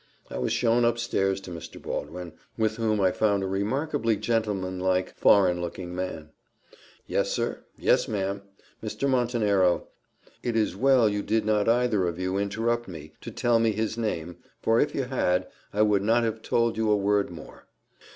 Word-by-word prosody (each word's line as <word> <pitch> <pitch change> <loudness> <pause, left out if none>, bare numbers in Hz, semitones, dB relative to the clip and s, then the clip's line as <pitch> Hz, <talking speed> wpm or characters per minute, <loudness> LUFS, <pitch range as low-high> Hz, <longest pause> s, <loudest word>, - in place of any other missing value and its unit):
I 60 - -4
was 65 - -1
shown 120 0 +2
up 120 0 +2
stairs 95 -4 0
to 95 - -9
Mr. 85 -1 -8
Baldwin, 90 -2 -5 0.2
with 110 0 0
whom 110 -2 +1
I 95 -2 +3
found 100 0 +1
a - - -1
remarkably 110 +3 0
gentlemanlike 95 -5 -1
foreign 90 -3 +4
looking 90 +1 -5
man. 80 -4 -5 0.7
"Yes, - - 0
sir - - -2
yes, - - +2
ma'am 100 -1 -2 0.4
Mr. 110 +5 -2
Montenero: 110 -8 +2 0.5
it 120 -2 -2
is 110 -1 +1
well 130 -3 +4
you 105 -1 0
did 110 +1 0
not 105 0 +2
either 115 -6 +2
of 85 -1 -3
you 95 +1 -1
interrupt 115 +4 -1
me 80 -4 -9
to - - -7
tell 120 -1 +2
me 115 -1 +2
his 110 +1 -2
name, 90 -7 -3 0.2
for 115 +1 +2
if 145 - +1
you 135 - 0
had, 120 -9 0 0.2
I 105 +1 +2
would 105 -2 +3
not 115 +4 +3
have 110 -1 -2
told 115 0 +1
you 110 -1 +1
a 105 - +4
word 100 0 +1
more. 85 -3 -12
105 Hz, 175 wpm, -26 LUFS, 95-115 Hz, 0.7 s, foreign